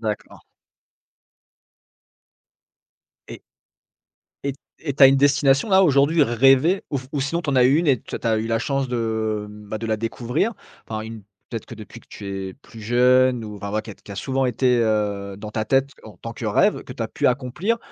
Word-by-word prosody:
D'accord. 105 -3 -5 2.9
Et - - -9 1.0
et 140 - -1
t 135 - -18 0.2
et 145 -4 -3
tu 140 - +1
as 135 - +12
une 135 - +4
destination 140 +4 +3
là 190 0 +6
aujourd'hui, 150 +2 +4
rêvée 135 - +4
ou 140 - -1
f 130 - -10
ou 145 - -1
sinon 165 +6 -1
t'en 140 -3 -1
as 125 - +6
eu 135 +4 +5
une 170 - 0
et 130 -5 +3
tu - - -6
as 115 -1 +1
eu 110 - -3
la 115 0 0
chance 135 +2 -1
de, 110 -3 -2
bah, 105 0 -8
de 115 - -5
la 110 -1 0
découvrir? 120 - -2 0.4
Enfin 110 -1 -3
une 110 -1 -8 0.3
peut-être 115 -3 -5
que - - -9
depuis 105 -3 -11
que - - -26
tu 100 - -9 0.2
es - - -10
plus 115 -4 -15
jeune, 125 +2 +3
ou 105 -1 -8
enfin 100 +1 -6
voilà 110 +1 -1
qui 110 - -10
a - - -9
qui 100 - -13
a - - -9
souvent 135 +4 -1
été, 125 0 +2
heu, 105 -3 -1
dans 105 0 -7
ta 110 0 -2
tête 135 +4 +1
en 110 - -12
tant 115 - -7
que - - -7
rêve, 105 - +2
que - - -8
tu - - -5
as - - -3
pu - - -1
accomplir? 135 - 0
125 Hz, 210 wpm, -22 LUFS, 110-135 Hz, 2.9 s, as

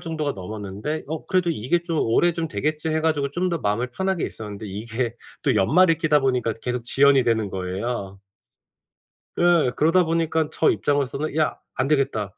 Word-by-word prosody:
정도가 160 -4 -3
넘었는데 105 +8 -5
'어 160 +1 -5
그래도 180 -2 +1
이게 160 +4 0
좀 165 -3 -2
올해 170 +10 +3
좀 165 0 -2
되겠지.' 155 +1 -2
해 160 0 0
가지고 145 -3 0
좀 180 +4 -1
더 170 - -1
마음을 110 +1 -1
편하게 190 +5 -1
있었는데 105 -1 -6
이게 115 +4 -3 0.3
또 - - +2
연말이 165 - +4
끼다 150 -2 +3
보니까 125 -4 0
계속 125 -1 -2
지연이 135 +2 +4
되는 110 -3 +1
거예요. 95 +2 -4 1.2
예. 175 -6 +4
그러다 165 +4 +4
보니깐 160 -1 0
저 - - +3
입장으로서는 145 +1 -1
"야 155 - +1 0.2
안 130 +2 -1
되겠다." 135 -10 0
140 Hz, 370 characters per minute, -23 LUFS, 110-160 Hz, 1.2 s, 연말이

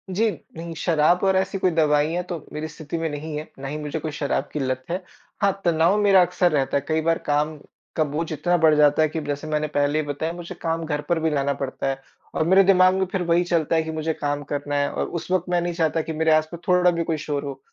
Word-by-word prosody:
जी, 220 +3 +3 0.3
नहीं 165 0 -6
शराब 165 +1 +3
और 190 -1 +3
ऐसी 190 +1 0
कोई 185 - +2
दवाईयाँ 155 +2 +2
तो 175 - -2 0.2
मेरी 150 +1 -4
स्थिति 160 0 -6
में 165 -1 -1
नहीं 150 +1 -5
है, 155 - -7
ना 135 - -5
ही 145 +2 -4
मुझे 150 +1 -4
कोई 155 0 -4
शराब 145 -1 -2
की 150 - -2
लत 130 -1 -2
है। 180 +3 -2 0.4
हाँ 200 -1 +4
तनाव 170 +4 +3
मेरा 195 -2 +6
अक्सर 180 0 +2
रहता 140 -2 +1
है। 140 - -4
कई 160 0 +1
बार 165 +1 +2
काम 150 +1 +1 0.4
का 155 - +3
बोझ 155 +3 -3
इतना 175 +3 +1
बढ़ 160 -2 +5
जाता 150 0 +4
है 155 - +3
कि 160 0 -4
जैसे 145 +1 -4
मैंने 155 0 0
पहले 145 +1 +1
ही 155 - -2
बताया, 150 +3 -3
मुझे 175 +1 -8
काम 165 0 -1
घर 150 -1 -2
पर 170 - +2
भी 160 0 +1
लाना 140 -2 0
पड़ता 135 0 -4
है 135 0 -3 0.3
और 155 - +1
मेरे 190 +2 +6
दिमाग़ 185 -1 +5
में 190 - +1
फिर 190 -3 -1
वही 170 +1 +3
चलता 170 -2 0
है 160 - +2
कि 160 - -5
मुझे 160 0 -2
काम 145 -1 -2
करना 145 0 -2
है 145 0 +1
और - - -2
उस 170 - -6
वक़्त 185 -2 +1
मैं 175 -1 +2
नहीं 175 0 -2
चाहता 165 -1 +1
कि 160 +1 -5
मेरे 160 +1 +2
आस-पास 155 +2 0
थोड़ा 180 -1 +4
भी 170 -1 -1
कुछ 160 -1 -2
शोर 145 -1 -3
हो 140 -2 -6
160 Hz, 260 wpm, -23 LUFS, 150-175 Hz, 0.4 s, मेरा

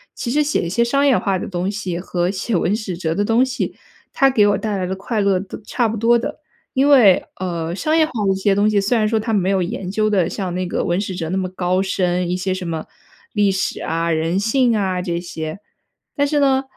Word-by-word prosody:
其 235 - -3
实 300 +2 +2
写 295 0 +1
一 170 - -3
些 215 +7 0
商 275 +4 +2
业 270 - +5
化 195 -3 0
的 - - -5
东 180 0 -2
西 190 -4 -3
和 175 0 -1
写 200 +2 -2
文 180 +3 +1
史 195 -6 -5
哲 160 -3 -1
的 205 +4 0
东 230 +4 +3
西， 260 0 -3 0.4
它 270 -1 +4
给 210 -5 +4
我 205 - +2
带 215 -3 -2
来 185 - -2
的 190 - -2
快 210 +4 -3
乐 200 -2 +2
都 195 - -8
差 235 +2 0
不 220 - -3
多 235 +2 +4
的。 235 - -5 0.3
因 270 +2 +3
为， 235 -10 +6
呃， 170 -2 -3
商 310 +10 0
业 325 - +5
化 - - -9
的 195 - +3
一 - - +1
些 195 0 +2
东 205 +1 +3
西， 210 -1 +3
虽 230 +4 +1
然 215 - +2
说 220 0 +1
它 225 +1 -3
没 195 -2 +1
有 190 -2 +1
研 190 0 -4
究 215 +1 +1
得 185 -5 +2
像 185 -4 -4
那 185 - -1
个 180 - -2
文 175 +2 0
史 200 -2 -3
哲 165 -3 -4
那 190 - -1
么 185 -1 -1
高 185 0 0
深， 180 -2 0
一 - - +1
些 190 +1 -2
什 185 -1 -5
么 160 -1 -4 0.5
历 205 -2 +3
史 190 0 -2
啊、 165 +1 -1
人 165 +3 0
性 235 +3 +2
啊 190 -3 0
这 170 -2 -2
些。 160 0 -6 0.6
但 285 - +2
是 295 0 +1
呢， 270 -1 +3
195 Hz, 275 characters per minute, -20 LUFS, 180-225 Hz, 0.6 s, 为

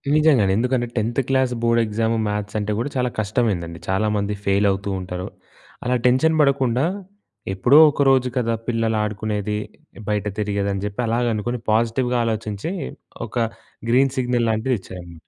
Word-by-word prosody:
నిజంగానే. 145 -11 +4
ఎందుకంటే 125 +1 0
tenth 115 +3 0
class 130 -1 +2
board 115 0 +3
exam 110 +2 0
మ్యాస్ 105 0 -3
అంటే 105 0 -2
కూడా 125 - -2
చాలా 125 -1 +1
కష్టమైందండి. 100 -7 -1
చాలామంది 105 +1 0
ఫెయిల్ 100 +1 +2
అవుతూ 95 +1 -3
ఉంటారు. 90 0 -5 0.6
అలా 125 +1 +1
టెన్షన్ 145 +6 +3
పడకుండా 135 -2 +2 0.7
ఎప్పుడో 120 +9 +4
ఒక 145 - -2
రోజు 130 -1 +3
కదా 115 -2 +1
పిల్లలు 115 -2 0
ఆడుకునేది, 105 0 -2 0.5
బయట 105 -1 0
తిరిగేది 100 -1 -1
అని 100 - -4
చెప్పి 105 +4 -3
అలాగ 120 +2 +1
అనుకుని 120 +4 -3
పాజిటివ్‌గా 120 +3 +1
ఆలోచించి 110 - -3 0.6
ఒక 110 - -14 0.5
గ్రీన్ 130 +2 +3
సిగ్నల్ 125 -2 +1
లాంటిది 110 +4 +1
ఇచ్చారు. 90 -2 -10
115 Hz, 145 wpm, -22 LUFS, 105-125 Hz, 0.7 s, నిజంగానే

